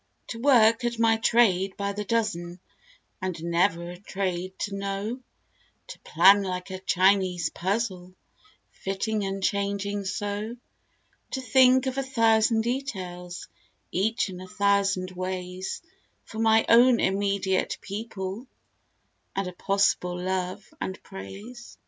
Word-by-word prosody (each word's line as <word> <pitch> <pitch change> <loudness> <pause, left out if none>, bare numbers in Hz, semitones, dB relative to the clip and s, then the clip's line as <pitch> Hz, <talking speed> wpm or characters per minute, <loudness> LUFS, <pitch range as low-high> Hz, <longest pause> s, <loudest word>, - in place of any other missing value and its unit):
To 230 - -5
work 235 -3 +5
at 240 -1 -1
my 225 0 +3
trade 195 -5 +3
by 200 0 -2
the 210 +1 -4
dozen 190 -6 -2 0.6
and 185 -3 -4
never 170 0 +1
a 175 - -10
trade 185 -2 -3
to 200 - -2
know; 200 +4 -3 0.7
To - - -9
plan 190 +5 +5
like 185 -1 -4
a 185 - -5
Chinese 185 -2 +2
puzzle 185 -1 -2 0.6
fitting 205 +2 -2
and 195 0 -4
changing 200 0 -1
so; 205 +4 -3 0.8
To 265 - -2
think 255 +1 +5
of 260 +1 -1
a - - +2
thousand 225 -3 +3
details, 185 -8 -4 0.4
each 220 +6 0
in 185 -1 -8
a 185 - -9
thousand 200 -2 +1
ways; 185 - -5 0.4
For 220 - -9
my 225 0 +4
own 240 +1 +6
immediate 195 -1 0
people 205 +2 -6 0.9
and 195 -1 -1
a 180 - -6
possible 180 -2 +1
love 185 +1 -3
and 190 - -4
praise. 210 - -10
200 Hz, 125 wpm, -26 LUFS, 185-225 Hz, 0.9 s, own